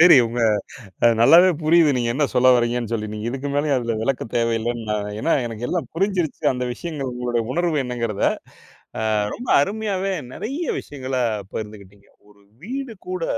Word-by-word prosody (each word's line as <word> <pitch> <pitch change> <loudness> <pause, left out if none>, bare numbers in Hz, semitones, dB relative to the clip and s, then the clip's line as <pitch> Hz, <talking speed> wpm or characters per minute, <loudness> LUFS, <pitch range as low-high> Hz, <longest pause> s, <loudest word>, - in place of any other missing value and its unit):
சரி 170 -3 +9
உங்க 120 +1 -3 0.8
நல்லாவே 170 +9 +8
புரியுது 160 -1 +5
நீங்க 120 -1 0
என்ன 145 +1 +2
சொல்ல 130 +1 +4
வரீங்கன்னு 120 -1 0
சொல்லி. 110 -2 -1
நீங்க 105 +1 -5
இதுக்கு 135 +3 -4
மேலயும் 145 -1 +2
அதுல 115 -2 -2
விளக்கம் 125 -2 -2
தேவையில்லைன்னு, 115 0 0
நா - - +1 0.2
ஏன்னா 165 - +1
எனக்கு 115 +1 -6
எல்லாம் 165 -9 -2
புரிஞ்சிருச்சு 185 -3 -1
அந்த 125 0 -3
விஷயங்கள் 145 -3 -5
உங்களுடைய 120 -1 -1
உணர்வு 170 0 0
என்னங்கிறத. 115 -4 -3 0.8
அ - - -2 0.3
ரொம்ப 245 - -7
அருமையாவே 195 +1 -1 0.2
நிறைய 290 +9 -4
விஷயங்களை 130 -2 -4 0.3
பகிர்ந்து 105 -1 -6
கிட்டீங்க. 100 +1 -19 0.2
ஒரு 100 0 -22 0.2
வீடு 260 +1 -5
கூட 180 -2 -3
130 Hz, 155 wpm, -22 LUFS, 115-170 Hz, 0.8 s, சரி